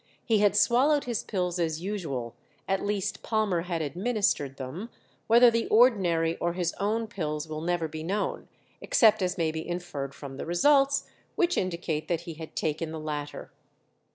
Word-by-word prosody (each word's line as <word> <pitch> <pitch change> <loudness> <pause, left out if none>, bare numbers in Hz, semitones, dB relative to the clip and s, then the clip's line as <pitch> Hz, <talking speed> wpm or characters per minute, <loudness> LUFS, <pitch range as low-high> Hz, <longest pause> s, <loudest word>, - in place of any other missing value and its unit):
He 220 -3 +3
had 205 -1 +3
swallowed 275 +7 +4
his 240 -3 -2
pills 180 -3 -2
as 160 -2 0
usual, 160 - -4 0.3
at 195 0 0
least 205 -2 -2
Palmer 215 -6 0
had 170 -2 -2
administered 175 - 0
them 150 - -6 0.4
whether 235 +1 +7
the 230 0 0
ordinary 180 -9 +3
or 170 0 -1
his 175 -1 -1
own 220 +3 0
pills 155 -8 -4
will 155 0 -5
never 170 -1 0
be 155 +1 -7
known, 195 +6 -2 0.3
except 220 -2 +4
as 180 0 -1
may 165 -2 +1
be 160 0 -4
inferred 175 -6 -4
from 135 -2 -8
the - - -5
results, 275 - +3 0.3
which 355 0 +2
indicate 170 -4 -2
that 170 -2 -1
he 170 -1 -7
had 160 0 -10
taken 155 +1 -1
the 160 - -5
latter. 150 -1 -5
175 Hz, 170 wpm, -28 LUFS, 160-215 Hz, 0.4 s, whether